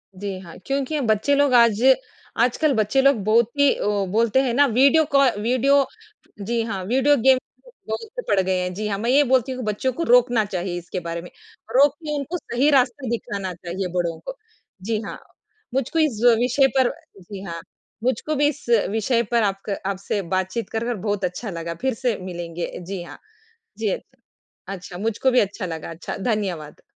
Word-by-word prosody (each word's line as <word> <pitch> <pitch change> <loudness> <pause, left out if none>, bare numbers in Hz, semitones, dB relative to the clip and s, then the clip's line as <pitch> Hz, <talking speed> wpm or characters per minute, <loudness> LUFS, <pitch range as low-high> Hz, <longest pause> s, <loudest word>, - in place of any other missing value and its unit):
जी, 195 0 -5
हाँ, 170 -3 -11
क्योंकि 275 +2 -1
बच्चे 220 +4 +2
लोग 280 -2 +3
आज 235 -2 +5 0.6
आजकल 275 +4 +2 0.3
लोग 275 -8 +3
बहुत 225 +2 +3
ही 285 - +6
उ 205 -1 0
बोलते 230 +4 +3
हैं 255 -3 0
ना 285 +3 +5
वीडियो 280 +6 +5
कॉ 275 0 +5 0.2
वीडियो 265 +5 +3 0.6
जी, 230 +3 -1
हाँ, 195 -4 -4
वीडियो 265 +7 +3
गेम 260 +2 +5 0.5
बहुत 460 +3 -5
पड़ 200 - +3
गए 185 -1 +1
हैं, 180 0 -3
जी 210 +3 -3
हाँ, 200 - -1
मैं 235 +3 -1
ये 285 +3 +5
बोलती 260 -1 +2
हूँ 255 - -4
कि 235 - -5
बच्चों 260 +5 -1
को 335 - -3
रोकना 245 -3 +4
चाहिए 180 -2 -3
इसके 175 +2 -5
बारे 170 -1 -5
में। 175 - -11 0.5
रोक 280 +1 +6
के 300 -1 -2
उनको 305 +6 -3
सही 275 -1 0
रास्ता 260 -1 +2
दिखाना 200 -5 -3
चाहिए 180 +2 -5
बड़ों 170 -2 -1
को - - -6 0.5
जी 220 0 0
हाँ, - - -7 0.5
मुझको 270 +5 0
इस 280 -9 +1 0.2
विषय 250 +3 +3
पर 260 -2 +4 0.3
जी, 190 +2 -9
हाँ, 170 -3 -6 0.4
मुझको 260 +5 0
भी 290 +1 +3
इस 290 0 -4 0.2
विषय 225 +3 +1
पर 235 -1 +3
आप 195 -1 -1
क 200 - -1
आपसे 200 +1 -2
बातचीत 190 +5 -2
कर 225 0 -2
कर 240 -1 -1
बहुत 205 0 -2
अच्छा 180 +5 -4
लगा, 170 -2 -5
फिर 265 0 +1
से 240 -1 -1
मिलेंगे 175 -2 -5
जी, 180 +1 -6
हाँ, - - -11 0.6
जी, 220 -1 -1 0.8
अच्छा, 180 -2 -7
मुझको 225 +6 0
भी 250 - +4
अच्छा 200 -1 -1
लगा, 165 -1 -6
अच्छा, 165 +1 -6
धन्यवाद। 190 -9 -3
225 Hz, 185 wpm, -22 LUFS, 190-265 Hz, 0.8 s, ही